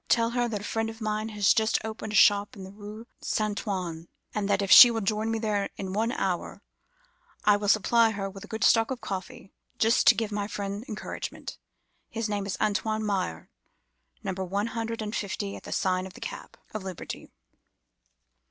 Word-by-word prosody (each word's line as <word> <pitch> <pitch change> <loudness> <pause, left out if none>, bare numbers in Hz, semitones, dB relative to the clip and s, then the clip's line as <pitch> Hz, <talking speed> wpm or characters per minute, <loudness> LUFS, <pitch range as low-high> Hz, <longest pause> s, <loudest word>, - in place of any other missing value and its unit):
Tell 230 0 +3
her 240 0 +1
that 210 -4 -3
a - - -9
friend 225 +1 -1
of 225 0 -9
mine 215 0 -2
has 205 -3 +3
just 220 0 +2
opened 220 -1 -5
a - - -3
shop 205 0 +5
in 195 - -9
the 190 - -9
Rue 210 +2 -10 0.2
Saint 215 -1 0
Antoine, 175 -5 -4 0.3
and 205 -1 -2
that 200 0 +2
if 195 - -2
she 245 - +12
will 225 -1 -1
join 215 +2 0
me 225 - 0
there 210 -3 -1
in 190 -1 -5
an 225 +3 +1
hour, 185 -7 -3 0.8
I 210 - +6
will 205 0 -4
supply 225 +3 +4
her 200 -3 -3
with 195 0 -10
a - - -10
good 220 -1 -4
stock 225 -1 +5
of 260 -2 -3
coffee, 200 +3 -7 0.2
just 225 +2 +3
to 240 - +8
give 220 0 -2
my 205 -1 -2
friend 200 0 -4
encouragement. 210 - -6 0.5
His 225 -1 -3
name 205 -1 -2
is 195 - -3
Antoine 215 +1 0
Meyer, 195 -3 -2 0.7
Number 190 -2 -3
One 200 +3 -1
hundred 230 -1 -3
and 210 +1 -4
Fifty 200 0 -3
at - - -11
the - - -8
sign 185 0 0
of 185 - -13
the - - -11
Cap - - -8 0.2
of 215 - -3
Liberty. 190 -2 -7
210 Hz, 200 wpm, -27 LUFS, 200-225 Hz, 0.8 s, she